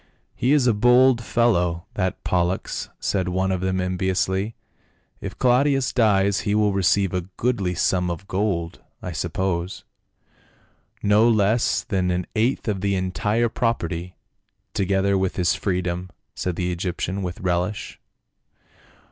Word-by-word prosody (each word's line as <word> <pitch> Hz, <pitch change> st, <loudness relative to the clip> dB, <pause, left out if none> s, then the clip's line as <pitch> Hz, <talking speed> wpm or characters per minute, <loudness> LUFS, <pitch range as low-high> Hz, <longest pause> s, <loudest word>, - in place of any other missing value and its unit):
" -, -, -43 dB
He 125 Hz, -, +1 dB
is 145 Hz, -4 st, +4 dB
a 120 Hz, -, +4 dB
bold 125 Hz, +3 st, +4 dB
fellow, 90 Hz, -9 st, +1 dB
that 95 Hz, -1 st, -2 dB
Pollux," 90 Hz, +1 st, -1 dB
said 95 Hz, -3 st, -1 dB
one 95 Hz, +1 st, 0 dB
of 95 Hz, -1 st, -1 dB
them 95 Hz, 0 st, 0 dB
enviously, 95 Hz, +3 st, -1 dB, 0.3 s
" -, -, -41 dB
if -, -, -6 dB
Claudius 135 Hz, +2 st, +2 dB
dies 100 Hz, -4 st, +3 dB
he 105 Hz, -, -1 dB
will 105 Hz, -1 st, +2 dB
receive 95 Hz, 0 st, +2 dB
a 90 Hz, 0 st, -3 dB
goodly 100 Hz, -7 st, 0 dB
sum 90 Hz, +1 st, +1 dB
of 85 Hz, +3 st, -5 dB
gold, 95 Hz, -4 st, -2 dB, 0.2 s
I 90 Hz, -, -4 dB
suppose." 85 Hz, +2 st, -2 dB, 0.6 s
" -, -, -36 dB
No 105 Hz, +3 st, +5 dB
less 110 Hz, +1 st, +2 dB
than 95 Hz, -3 st, -1 dB
an 90 Hz, 0 st, -1 dB
eighth 115 Hz, +4 st, 0 dB
of 100 Hz, -3 st, -1 dB
the 100 Hz, 0 st, +1 dB
entire 105 Hz, +5 st, 0 dB
property," 90 Hz, -7 st, -2 dB, 0.6 s
together 100 Hz, 0 st, +1 dB
with 95 Hz, -1 st, -1 dB
his 90 Hz, -2 st, +2 dB
freedom," 90 Hz, -1 st, -2 dB, 0.2 s
said 90 Hz, -2 st, -3 dB
the 90 Hz, 0 st, -1 dB
Egyptian 90 Hz, +2 st, -3 dB
with 90 Hz, -2 st, -4 dB
relish. 90 Hz, +2 st, -2 dB
95 Hz, 145 wpm, -23 LUFS, 90-105 Hz, 0.6 s, No